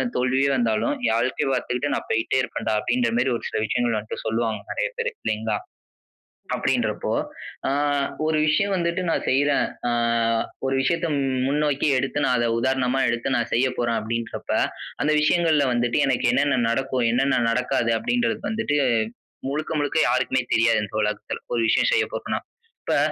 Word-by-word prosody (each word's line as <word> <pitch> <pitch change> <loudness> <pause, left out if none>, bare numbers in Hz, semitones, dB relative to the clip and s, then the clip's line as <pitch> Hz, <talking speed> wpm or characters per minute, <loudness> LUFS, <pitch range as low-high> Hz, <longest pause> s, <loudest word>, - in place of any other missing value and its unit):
தோல்வியே 130 +2 +2
வந்தாலும், 115 - +1
என் - - +2
வாழ்க்கைய 125 +3 0
பார்த்துக்கிட்டு 125 +2 -1
நான் - - -5
போயிட்டே 115 +3 +1
இருப்பேன்டா!" 110 -3 -2
அப்பிடின்ற 120 +1 0
மாரி 125 +2 +2
ஒரு - - -14
சில 110 - -2
விஷயங்கள 120 -2 0
என்ட்ட 110 - -7
சொல்லுவாங்க. 110 0 -1
நிறைய - - -1
பேரு 475 +1 -1
இல்லேங்களா! 110 0 -1 1.0
அப்பிடின்றப்போ - - -1 0.6
ஆ - - +1 0.5
ஒரு 155 0 +1
விஷயம் 200 +6 +2
வந்துட்டு 170 0 -1
நான் 165 - 0
செய்றேன். 145 +2 +3 0.2
ஆ - - +1 0.7
ஒரு 135 - 0
விஷயத்த 170 +6 +1 0.4
முன்னோக்கி 145 +1 +1
எடுத்து 135 +3 -1
நான் 125 - +2
அத 120 0 +1
உதாரணமா 130 +1 +1
எடுத்து 120 +2 -1
நான் 120 -1 0
செய்ய 125 +3 +3
போறேன் 120 -1 0
அப்பிடின்றப்ப 115 +1 -4 0.5
அந்த 150 - +2
விஷயங்கள்ல 155 -1 +3
வந்துட்டு 120 +1 +1
எனக்கு 130 - +1
என்னென்ன 145 -2 +2
நடக்கும்? 130 +1 0
என்னென்ன 135 +2 +2
நடக்காது? 115 -1 0
அப்பிடின்றது 230 - 0
வந்துட்டு 210 -10 0 0.7
முழுக்க, 155 +3 -3
முழுக்க 145 +1 0
யாருக்குமே 130 0 +1
தெரியாது 115 0 +4
இந்த 105 +1 -3
உலகத்துல. 105 0 -3
ஒரு 115 - +1
விஷயம் 115 - +3
செய்ய 475 -3 +3
போறன்னா. - - -3 0.4
இப்ப - - 0
130 Hz, 155 wpm, -23 LUFS, 115-145 Hz, 1.0 s, தெரியாது